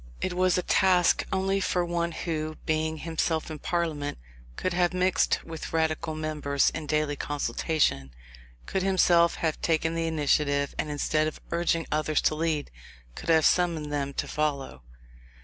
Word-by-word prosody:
It 185 - -2
was 185 0 +2
a 180 - 0
task 180 -2 +3
only 195 +1 +1
for 180 -2 0
one 170 0 -1
who, 155 -2 -3
being 160 0 0
himself 160 0 -2
in 155 - -6
Parliament, 155 -4 -2 0.4
could 185 - -2
have 175 0 +1
mixed 185 0 +2
with 165 -1 -7
the 165 - -1
Radical 160 0 -1
members 150 -2 0
in 155 -1 -6
daily 150 -1 0
consultation, 140 - -1 0.6
could 190 - -1
himself 175 -3 +4
have 160 -2 -2
taken 160 0 +1
the 165 0 -1
initiative, 145 -2 +1
and 150 - -1
instead 155 +1 0
of 155 - -6
urging 170 -1 +1
others 155 0 +1
to - - +2
lead, 155 -1 -1 0.4
could - - -8
have 160 -2 +5
summoned 165 -4 +2
them 140 -1 -1
to - - -2
follow. 140 - -2
160 Hz, 160 wpm, -27 LUFS, 150-170 Hz, 0.6 s, have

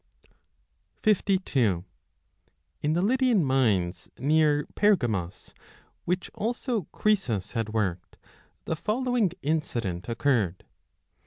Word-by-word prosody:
52 160 - +2 1.0
In 150 +1 +1
the 175 +2 +1
Lydian 245 - +3
mines 110 -10 +1
near 150 +1 +3
Pergamos, 120 - 0 0.5
which 180 +2 -2
also 230 - -2
Croesus 160 - 0
had 115 -3 -2
worked, 95 -6 -2 0.5
the 160 - -1
following 230 +2 0
incident 120 - -2
occurred. 115 -7 0
145 Hz, 85 wpm, -27 LUFS, -, 1.0 s, Lydian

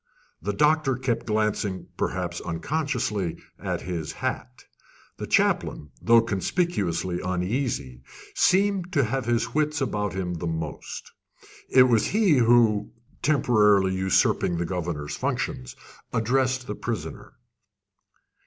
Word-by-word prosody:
The 100 +6 -1
doctor 150 +1 +3
kept 125 -2 -2
glancing, 105 -3 -1
perhaps 90 -2 -2
unconsciously, 105 - -2 0.2
at - - -3
his 85 -4 -4
hat. 60 0 -5 0.5
The - - -5
chaplain, 75 - +1
though 115 0 +6
conspicuously 95 - -1
uneasy, 90 - -2 0.3
seemed 195 -1 +2
to 140 -4 +3
have 130 +2 -2
his 115 0 0
wits 150 0 +1
about 105 -7 -1
him 90 -2 -3
most. 80 -2 -5 0.6
It 130 - +7
was 120 -4 +3
he 205 -8 +3
who, 115 -3 +4 0.3
temporarily 105 -9 +3
usurping 95 -2 +2
the 85 - -1
governor's 85 -4 -3
functions, 65 -1 -3 0.4
addressed 130 +3 +1
the - - -4
prisoner. 115 -2 -5
105 Hz, 110 wpm, -25 LUFS, 90-130 Hz, 0.6 s, It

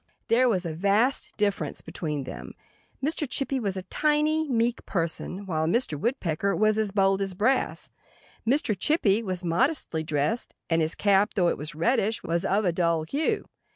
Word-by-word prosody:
There 250 +2 +4
was 185 -5 0
a 165 - -3
vast 200 - +1
difference 205 -1 -1
between 150 -4 -4
them. - - -8 0.5
Mr. 300 -2 -1
Chippy 275 0 -1
was 200 -5 -2
a 185 - -4
tiny, 305 +4 +1
meek 235 -1 0
person, 180 +2 -1
while 160 -4 -1
Mr. 230 -2 +1
Woodpecker 195 - -1
was 215 0 +2
as 215 -2 +1
bold 195 -1 +2
as 195 -2 -2
brass. 240 +8 0 0.5
Mr. 235 -2 +1
Chippy 215 - +2
was 185 -4 -4
modestly 175 - +1
dressed; 155 +9 -1 0.2
and 165 0 +3
his 160 +1 -1
cap, 200 0 +2
though 180 -3 +3
it - - -1
was 150 +1 -6
reddish, 220 +5 +1
was 170 +2 -1
of 200 +2 +1
a 180 - +3
dull 170 -2 +1
hue. 285 - -1
200 Hz, 170 wpm, -26 LUFS, 170-240 Hz, 0.5 s, There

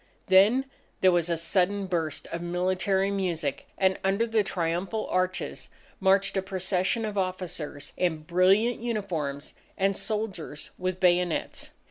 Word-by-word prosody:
Then 205 +8 +5 0.4
there 185 - +6
was 175 -1 +1
a 170 - +1
sudden 190 +4 +1
burst 165 -5 -2
of 170 - -4
military 185 +3 0
music, 175 -8 -2
and 190 -1 +2
under 195 +4 +2
the 225 -1 +2
triumphal 180 +4 -2
arches 185 0 -1 0.3
marched 195 +1 +3
a 190 - +2
procession 190 +3 0
of 205 -2 -2
officers 180 -6 -4
in 160 -4 0
brilliant 190 +8 +3
uniforms 175 -12 -3 0.2
and 195 0 +2
soldiers 200 -10 -4
with 185 0 -3
bayonets. 180 -2 +1
185 Hz, 130 wpm, -27 LUFS, 175-195 Hz, 0.4 s, there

